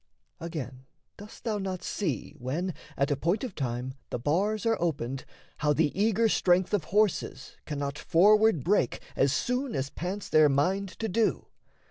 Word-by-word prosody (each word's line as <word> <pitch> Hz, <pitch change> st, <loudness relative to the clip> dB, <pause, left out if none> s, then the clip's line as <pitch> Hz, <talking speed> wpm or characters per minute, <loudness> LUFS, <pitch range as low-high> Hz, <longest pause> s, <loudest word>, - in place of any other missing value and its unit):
Again, 135 Hz, -6 st, -6 dB, 0.3 s
Dost 210 Hz, +1 st, -12 dB
thou 215 Hz, -3 st, -1 dB
not 185 Hz, -2 st, -4 dB
see, 155 Hz, -, -3 dB
when, 160 Hz, +9 st, -2 dB, 0.2 s
at 140 Hz, +1 st, +1 dB
a -, -, +3 dB
point 170 Hz, -, 0 dB
of 250 Hz, -, -4 dB
time, 125 Hz, -2 st, -3 dB, 0.2 s
The -, -, -2 dB
bars 195 Hz, -, 0 dB
are 225 Hz, -4 st, +1 dB
opened, 135 Hz, -6 st, -2 dB, 0.3 s
how 150 Hz, -1 st, +2 dB
the 150 Hz, -1 st, +2 dB
eager 220 Hz, +3 st, +3 dB
strength 185 Hz, -3 st, +2 dB
Of 190 Hz, -7 st, +1 dB
horses 210 Hz, -1 st, 0 dB
cannot 145 Hz, -1 st, -3 dB
forward 210 Hz, 0 st, +4 dB
break 180 Hz, -, +1 dB, 0.2 s
as 135 Hz, -, +3 dB
soon 250 Hz, -, -1 dB
As 135 Hz, +1 st, -2 dB
pants 185 Hz, +4 st, -4 dB
their 155 Hz, -1 st, +5 dB
mind 185 Hz, +8 st, +1 dB
to 225 Hz, -, -2 dB
do? 220 Hz, +2 st, 0 dB
175 Hz, 160 wpm, -28 LUFS, 140-205 Hz, 0.3 s, their